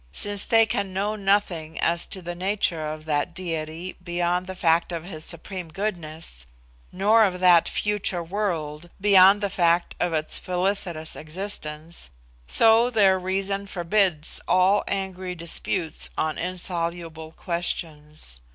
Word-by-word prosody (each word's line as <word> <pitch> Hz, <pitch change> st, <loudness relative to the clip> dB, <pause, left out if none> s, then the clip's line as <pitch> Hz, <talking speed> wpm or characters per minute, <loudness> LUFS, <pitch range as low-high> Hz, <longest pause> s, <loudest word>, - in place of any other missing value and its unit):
since 205 Hz, -, -1 dB
they 225 Hz, -1 st, +5 dB
can 200 Hz, -3 st, -2 dB
know 205 Hz, +3 st, -1 dB
nothing 195 Hz, -6 st, 0 dB
as 170 Hz, 0 st, +1 dB
to 190 Hz, -, -6 dB
the 175 Hz, +1 st, -4 dB
nature 180 Hz, -3 st, -1 dB
of 155 Hz, 0 st, -8 dB
that 155 Hz, +2 st, -1 dB
Diety 165 Hz, 0 st, -4 dB
beyond 175 Hz, +1 st, -1 dB
the 190 Hz, -, -6 dB
fact 170 Hz, -1 st, +2 dB
of 165 Hz, -2 st, -4 dB
His 160 Hz, -4 st, -5 dB
supreme 180 Hz, +2 st, -3 dB
goodness, 160 Hz, -, -5 dB, 0.4 s
nor 215 Hz, +4 st, +4 dB
of 185 Hz, -3 st, 0 dB
that 180 Hz, -2 st, +5 dB
future 205 Hz, -4 st, -1 dB
world 170 Hz, -4 st, -3 dB
beyond 195 Hz, 0 st, +6 dB
the 200 Hz, -, 0 dB
fact 175 Hz, -1 st, +2 dB
of 175 Hz, -, 0 dB
its 155 Hz, -1 st, 0 dB
felicitous 180 Hz, -3 st, -1 dB
existence, 160 Hz, -1 st, -5 dB, 0.4 s
so 225 Hz, -, +5 dB
their 195 Hz, -5 st, +4 dB
reason 195 Hz, +2 st, -2 dB
forbids 175 Hz, -3 st, 0 dB
all 185 Hz, +3 st, +4 dB
angry 190 Hz, -2 st, -3 dB
disputes 170 Hz, 0 st, 0 dB
on 155 Hz, -1 st, 0 dB
insoluble 170 Hz, -2 st, -4 dB
questions. 155 Hz, -, -4 dB
180 Hz, 135 wpm, -24 LUFS, 165-195 Hz, 0.4 s, beyond